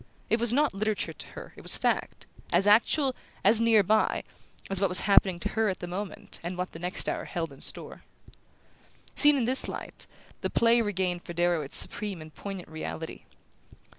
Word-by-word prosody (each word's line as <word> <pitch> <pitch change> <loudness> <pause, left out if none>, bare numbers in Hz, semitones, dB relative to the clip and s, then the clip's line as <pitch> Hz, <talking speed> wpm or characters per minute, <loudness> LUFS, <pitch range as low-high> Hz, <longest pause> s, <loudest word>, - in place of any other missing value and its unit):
It 225 - +3
was 235 0 +3
not 285 +1 +2
literature 200 -4 -2
to - - -8
her, - - -10
it - - -12
was - - +6
fact: - - -2 0.3
as 180 +3 +3
actual, 255 +6 +4 0.3
as 225 +1 +4
near 225 -2 +5
by, 215 +3 +1 0.4
as 195 -1 0
what 195 - +2
was 180 - +2
happening 195 -2 +4
to - - -2
her 220 -1 0
at 190 - -4
the - - -5
moment 190 +3 -6
and 175 +1 -5
what 180 +1 -3
the 165 - -10
next 180 +2 -2
hour - - -2
held 165 -5 -4
in 135 - -16
store. - - -6 1.1
Seen 295 -1 +5
in 245 - 0
this 255 +3 +2
light, - - -7 0.3
the - - -1
play 235 0 +3
regained 190 -4 -2
for 175 - -9
Darrow 175 -1 +1
its 140 - +2
supreme 205 -4 +2
and 155 0 -12
poignant 195 -3 -7
reality. 160 +1 -7
195 Hz, 195 wpm, -28 LUFS, 175-225 Hz, 1.1 s, was